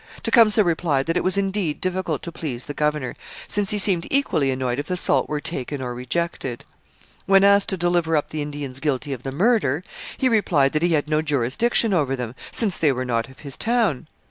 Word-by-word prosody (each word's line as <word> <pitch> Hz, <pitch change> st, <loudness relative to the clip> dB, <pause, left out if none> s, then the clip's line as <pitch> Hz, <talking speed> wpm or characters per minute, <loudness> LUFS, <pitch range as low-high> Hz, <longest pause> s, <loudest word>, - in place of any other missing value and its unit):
Tecumseh 220 Hz, -3 st, +5 dB
replied 160 Hz, -6 st, 0 dB
that 165 Hz, -, -1 dB
it -, -, +1 dB
was 185 Hz, +1 st, +2 dB
indeed 195 Hz, -5 st, -1 dB
difficult 185 Hz, -5 st, -2 dB
to 170 Hz, -, -6 dB
please 135 Hz, -7 st, -5 dB
the 145 Hz, -, -6 dB
governor, 150 Hz, -3 st, -1 dB, 0.3 s
since 205 Hz, -1 st, -1 dB
he 210 Hz, -, +2 dB
seemed 190 Hz, -4 st, +3 dB
equally 270 Hz, -, +1 dB
annoyed 130 Hz, -1 st, -1 dB
if 145 Hz, -, -4 dB
the 180 Hz, -, -2 dB
salt 140 Hz, -6 st, +1 dB
were 150 Hz, -, -2 dB
taken 145 Hz, -2 st, -3 dB
or 125 Hz, -2 st, -4 dB
rejected. 130 Hz, 0 st, -3 dB, 0.6 s
When 195 Hz, 0 st, +5 dB
asked 200 Hz, +1 st, +5 dB
to 190 Hz, -, -2 dB
deliver 175 Hz, -2 st, +1 dB
up 145 Hz, -, -2 dB
the 155 Hz, -, -4 dB
Indians 145 Hz, -3 st, -4 dB
guilty 140 Hz, -1 st, -2 dB
of 125 Hz, -, -7 dB
the 135 Hz, -, -5 dB
murder, 175 Hz, -, +1 dB, 0.3 s
he 260 Hz, -, +2 dB
replied 175 Hz, -, +2 dB
that 155 Hz, -, 0 dB
he 175 Hz, 0 st, +2 dB
had 150 Hz, -1 st, +1 dB
no 155 Hz, 0 st, +1 dB
jurisdiction 155 Hz, -, +1 dB
over 145 Hz, -6 st, +1 dB
them, 120 Hz, -3 st, -5 dB, 0.2 s
since 210 Hz, -6 st, 0 dB
they 155 Hz, -3 st, +3 dB
were 130 Hz, -1 st, -3 dB
not 115 Hz, -1 st, -1 dB
of 130 Hz, -, -16 dB
his 140 Hz, -3 st, -6 dB
town. 220 Hz, -, 0 dB
155 Hz, 210 wpm, -22 LUFS, 135-190 Hz, 0.6 s, Tecumseh